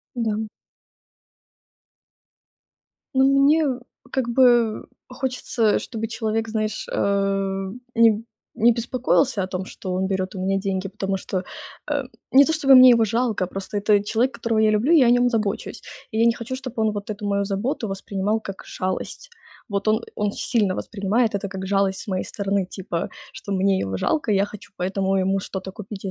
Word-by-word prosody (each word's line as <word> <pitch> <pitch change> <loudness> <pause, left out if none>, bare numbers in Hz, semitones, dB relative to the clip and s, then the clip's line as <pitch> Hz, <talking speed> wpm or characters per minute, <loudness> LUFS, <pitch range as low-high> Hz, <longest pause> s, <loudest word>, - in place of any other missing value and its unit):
Да. 220 -2 -1 2.7
Ну, 265 0 +4
мне 280 +3 +4 0.5
как 260 -3 -1
бы 240 -3 +3 0.2
хочется, 250 -4 0
чтобы 225 -2 -5
человек, 225 0 -2
знаешь, 215 -1 -2
э, 195 -1 0 0.3
не 230 -1 +6
б 215 +1 -2 0.3
не 235 +2 +4
беспокоился 245 -1 +1
о - - -1
том, 185 0 -4
что 185 -1 -6
он 190 +1 0
берёт 190 0 -2
у - - -6
меня 195 +1 +1
деньги, 195 -1 -2
потому 195 0 -2
что, 190 - -5 0.5
эм, - - -1 0.2
не 275 +2 +8
то 320 - 0
чтобы 275 -4 +5
мне 255 0 +10
его 230 -2 +5
жалко, 225 -3 0
просто 195 +2 -5
это 205 0 +3
человек, 235 +5 +1
которого 230 -1 -1
я 215 - +4
люблю 215 +10 +2
и 315 - +7
о - - +4
нём 245 0 +4
забочусь, 210 -4 -2 0.3
и 220 - -3
я 230 - +4
не 235 - +4
хочу, 240 +2 -5
чтобы 260 -2 -6
он 220 -1 +2
вот 205 -1 -6
эту 210 0 -5
мою 200 0 +1
заботу 215 +4 -2
воспринимал 195 +2 -2
как 195 -2 -7
шалость. 185 - -4 0.4
Вот 200 +1 -1
он 215 +1 +3 0.2
он 210 -1 0
сильно 210 -7 0
воспринимает 215 +2 0
это 200 0 -2
как 190 0 -6
жалость 195 -1 +1
с - - -10
моей 185 -2 -1
стороны, 200 -2 -1
типа, 180 -3 -3 0.2
что 200 - -6
мне 190 0 +2
его 95 -1 -2
жалко, 265 - 0
и - - +3
я 195 0 +3
хочу 205 -1 -11
поэтому 190 +1 0
ему 195 +1 +1
что-то 190 0 -6
купить 205 -1 -9
и 190 - -2
210 Hz, 180 wpm, -23 LUFS, 195-235 Hz, 2.7 s, мне